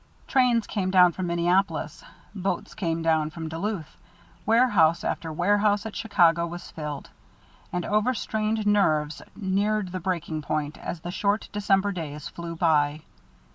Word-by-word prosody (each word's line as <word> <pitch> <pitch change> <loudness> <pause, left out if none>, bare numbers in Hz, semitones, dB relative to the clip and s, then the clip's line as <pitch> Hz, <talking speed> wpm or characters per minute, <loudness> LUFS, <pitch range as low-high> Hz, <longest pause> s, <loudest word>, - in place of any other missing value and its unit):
Trains 245 -4 +3
came 190 -3 -2
down 180 -2 +6
from 180 +1 -4
Minneapolis, 175 - 0 0.3
boats 195 -1 -3
came 165 -5 -2
down 160 -2 +2
from 160 0 -6
Duluth, 165 0 -4 0.5
warehouse 205 -8 +4
after 165 - -3
warehouse 205 +5 +2
at 220 - -6
Chicago 170 -6 +3
was 175 +1 -8
filled; 150 -2 -6 0.6
and 180 -1 -2
over 215 +5 +1
strained 215 0 -1
nerves 155 -8 +2
neared 200 0 0
the 185 - -3
breaking 170 -3 -2
point 150 0 -2
as 170 - -5
the 175 - -5
short 200 +3 0
December 200 -1 +1
days 150 -5 -6
flew 170 -1 -7
by. 155 -2 +2
180 Hz, 140 wpm, -26 LUFS, 160-205 Hz, 0.6 s, down